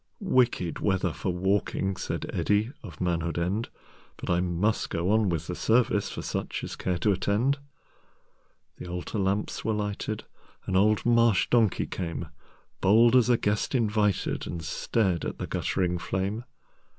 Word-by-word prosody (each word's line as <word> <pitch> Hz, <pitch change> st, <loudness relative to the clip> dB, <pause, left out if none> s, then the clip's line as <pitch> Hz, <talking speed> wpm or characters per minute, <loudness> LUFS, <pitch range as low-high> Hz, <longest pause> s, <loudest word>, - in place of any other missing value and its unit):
"'Wicked 120 Hz, -9 st, +1 dB
weather 95 Hz, -4 st, +1 dB
for 95 Hz, -, -2 dB
walking,"Said 95 Hz, 0 st, -1 dB
Eddi 105 Hz, +4 st, +1 dB
of 85 Hz, -9 st, -10 dB
Manhood 85 Hz, -2 st, -1 dB
End."But 90 Hz, +1 st, -5 dB
I 85 Hz, -, +3 dB
must 90 Hz, +5 st, 0 dB
go 85 Hz, +4 st, 0 dB
on 110 Hz, -2 st, +3 dB
with 85 Hz, -2 st, -2 dB
the 90 Hz, -, -4 dB
serviceFor 110 Hz, 0 st, +1 dB
such -, -, -3 dB
as -, -, -5 dB
care 90 Hz, -2 st, -1 dB
to 105 Hz, -, +2 dB
attend."The 125 Hz, 0 st, -5 dB
altar 90 Hz, +4 st, -4 dB
lamps 100 Hz, +2 st, -1 dB
were 110 Hz, -, 0 dB
lighted,—An 105 Hz, -2 st, -5 dB
old 105 Hz, +2 st, +3 dB
marsh 115 Hz, -4 st, +4 dB
donkey 115 Hz, -5 st, +3 dB
came, 85 Hz, -2 st, -4 dB, 0.5 s
Bold 115 Hz, +5 st, +5 dB
as 125 Hz, -1 st, +5 dB
a 120 Hz, -, +5 dB
guest 105 Hz, +6 st, 0 dB
invited, 105 Hz, -4 st, +1 dB
And 85 Hz, -2 st, -5 dB
stared 90 Hz, +2 st, 0 dB
at -, -, -4 dB
the -, -, -4 dB
guttering 90 Hz, -2 st, -1 dB
flame. 100 Hz, +6 st, -2 dB
100 Hz, 140 wpm, -27 LUFS, 90-110 Hz, 0.5 s, Bold